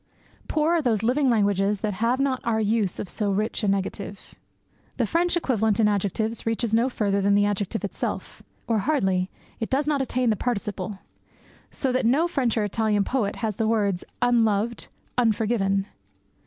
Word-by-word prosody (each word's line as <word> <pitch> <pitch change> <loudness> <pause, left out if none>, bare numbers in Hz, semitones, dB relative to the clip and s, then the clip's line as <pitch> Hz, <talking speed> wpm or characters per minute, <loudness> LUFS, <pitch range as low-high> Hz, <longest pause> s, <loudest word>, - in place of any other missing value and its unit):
Poor 310 +1 +1
are 335 - +3
those 225 -6 0
living 260 +4 +2
languages 205 -2 +2
that 215 -2 -1
have 230 +6 0
not 275 -2 0
our 225 -1 +1
use 215 -3 +1
of - - -4
so 210 +2 -1
rich 215 +4 -1
a - - +1
negative. 195 0 -3 0.6
The - - +2
French 345 +1 +1
equivalent 220 -9 +1
in 215 - +5
adjectives 210 +2 -1
reaches 225 0 -1
no 235 +3 +3
further 200 -5 0
than 200 +1 +3
the 205 0 +4
adjective 205 +1 -1
itself 200 - -4 0.2
or 225 -2 +1
hardly; 190 -8 +1 0.3
it 225 - -3
does 275 +2 +1
not 295 -2 +1
attain 250 -2 +1
the - - +1
participle; 205 -4 -3 0.7
so 265 - -2
that 250 -2 +1
no 295 +8 +3
French 255 -9 0
or 215 - +2
Italian 210 0 +1
poet 220 -3 -1
has 215 -3 -2
the 220 - +1
words 200 -5 +1 0.2
"unloved", 230 -2 +1 0.3
"unforgiven." 215 -4 +1
220 Hz, 170 wpm, -25 LUFS, 200-245 Hz, 0.7 s, in